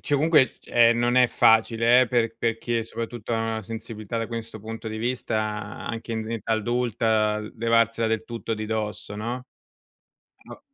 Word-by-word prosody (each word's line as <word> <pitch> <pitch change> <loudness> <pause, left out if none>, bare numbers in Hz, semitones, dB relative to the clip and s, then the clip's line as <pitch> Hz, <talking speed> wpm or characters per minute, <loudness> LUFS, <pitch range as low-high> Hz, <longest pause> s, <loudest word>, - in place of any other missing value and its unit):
cioè, 145 - -1
comunque, 150 -2 +3
ehm, 115 0 +4
non 120 +1 +2
è 125 0 +7
facile 115 +2 +4
eh, - - +1
per 115 -2 +1
per 115 -1 0
chi 120 0 -2
è - - -1
soprattutto 115 0 -5
ha - - +2
una 110 0 -2
sensibilità, 110 0 -6
da 115 - -2
questo 115 -2 -6
punto 110 +1 -6
di 110 - -5
vista, 120 0 -2 0.5
anche 115 0 -5
in 110 - -1
in 110 +1 -5
età 115 0 -2
adulta, 110 -1 +1
l 105 0 -7
levarsela 115 0 +2
del 110 0 -1
tutto 115 -1 -4
di 110 0 -5
dosso, 105 -1 -4
no? 120 +4 -4 1.0
Ma - - -11
115 Hz, 185 wpm, -25 LUFS, 110-120 Hz, 1.0 s, è